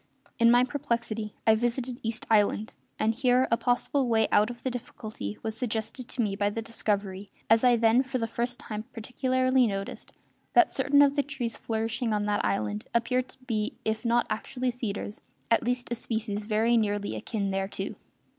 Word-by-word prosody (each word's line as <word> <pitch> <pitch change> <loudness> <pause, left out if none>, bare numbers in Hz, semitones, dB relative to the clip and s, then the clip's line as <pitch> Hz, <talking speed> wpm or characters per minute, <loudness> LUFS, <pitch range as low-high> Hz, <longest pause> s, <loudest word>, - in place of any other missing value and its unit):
In 230 0 +6
my 245 +1 +6
perplexity 235 -6 -2
I 220 - +7
visited 240 +2 -1
East 225 0 -3
Island, 215 0 +2 0.2
and 220 +1 +2
here 255 +1 +3
a - - +6
possible 245 +3 +1
way 225 -2 +3
out 210 +2 +4
of 240 0 -9
the 260 - -1
difficulty 215 - -6
was 220 -1 -1
suggested 225 +1 -3
to 240 - -1
me 200 -2 -1
by 205 0 +1
the 205 - -4
discovery 200 -3 -2 0.2
as 225 +1 +6
I 250 -1 +6
then 230 +2 +4
for 265 0 -3
the 230 - -1
first 240 +2 -3
time 215 0 -6
particularly 255 +2 +1
noticed 195 -1 -5 0.4
that 360 - +6
certain 285 +1 +4
of 280 0 +3
the 285 - +3
trees 260 -5 -4
flourishing 225 +1 -2
on 205 -1 0
that 210 0 0
island 105 +1 -1
appeared 250 +2 +1
to - - -15
be 215 -4 -1
if 220 0 -1
not 235 0 +2
actually 250 +4 -2
cedars 210 -3 -5 0.3
at 230 - +5
least 245 0 -1
a - - +2
species 220 -3 -3
very 225 +2 +3
nearly 205 -2 0
akin 200 -4 -2
thereto. 195 +1 -2
230 Hz, 185 wpm, -28 LUFS, 215-245 Hz, 0.4 s, I